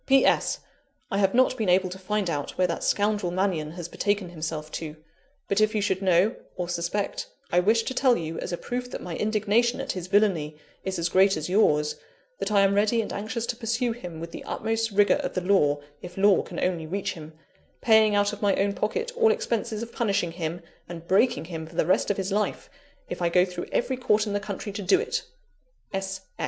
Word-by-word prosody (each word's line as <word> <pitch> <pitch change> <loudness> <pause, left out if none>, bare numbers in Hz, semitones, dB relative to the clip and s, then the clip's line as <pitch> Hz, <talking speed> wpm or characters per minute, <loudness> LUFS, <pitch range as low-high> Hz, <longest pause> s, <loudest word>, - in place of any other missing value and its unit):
"P. 270 0 +5
S. - - +2 0.5
I 195 - +1
have 195 +2 +2
not 255 0 +4
been 215 -5 0
able 185 0 +3
to 190 - -7
find 205 +1 -1
out 145 -4 -3
where 185 - +3
that 170 -2 -2
scoundrel 205 -3 +1
Mannion, 175 -5 -1
has 175 -2 -6
betaken 205 0 -1
himself 155 -2 -5
to; 155 -2 -5 0.5
but 200 +2 +1
if 215 +1 +2
you 210 - +1
should 190 -1 0
know, 190 +4 +3 0.2
or 180 - -3
suspect, 175 +3 -2 0.2
I 175 - +4
wish 220 +5 +3
to 260 - -3
tell 255 -2 +3
you, 160 0 -4
as - - -5
a 175 - -2
proof 245 +4 -4
that - - -6
my 175 -2 -5
indignation 215 +3 +1
at 270 - -2
his 185 -1 -5
villany 180 -7 +2 0.3
is 190 -1 -3
as 170 0 0
great 190 +1 +4
as 155 +2 -4
yours, 150 -7 +3 0.4
that - - -2
I 200 -1 +5
am 195 0 +4
ready 210 +3 +2
and - - -6
anxious 225 +3 -3
to 240 - -2
pursue 235 +1 -1
him 180 -8 -7
with 165 +1 -7
the - - -8
utmost 225 0 -1
rigour 205 0 +4
of - - -4
the 185 - 0
law, 175 -6 +3 0.2
if 180 +1 -10
law 200 -1 +5
can - - -7
only 170 -3 -1
reach 195 +3 -2
him 160 -1 -10 0.5
paying 220 -2 +5
out 205 0 +2
of 210 - -8
my 200 -2 +3
own 200 +1 +1
pocket 450 - -2
all 455 -2 +5
expenses 230 - -2
of 235 - -9
punishing 200 -7 0
him 170 0 -4 0.3
and 170 -1 -8
breaking 205 +1 +3
him 160 -2 -6
for 165 - -14
the 160 - +2
rest 185 - +2
of 205 - 0
his 195 0 -2
life, 205 0 -1 0.4
if 175 - -6
I 170 - +2
go 180 +1 +4
through 180 -1 -6
every 260 +1 0
court 215 -4 +2
in 205 - -3
the 205 - +1
country 205 0 -5
to 200 +1 -5
do 190 0 +4
it! - - -2
195 Hz, 220 wpm, -26 LUFS, 175-215 Hz, 0.5 s, P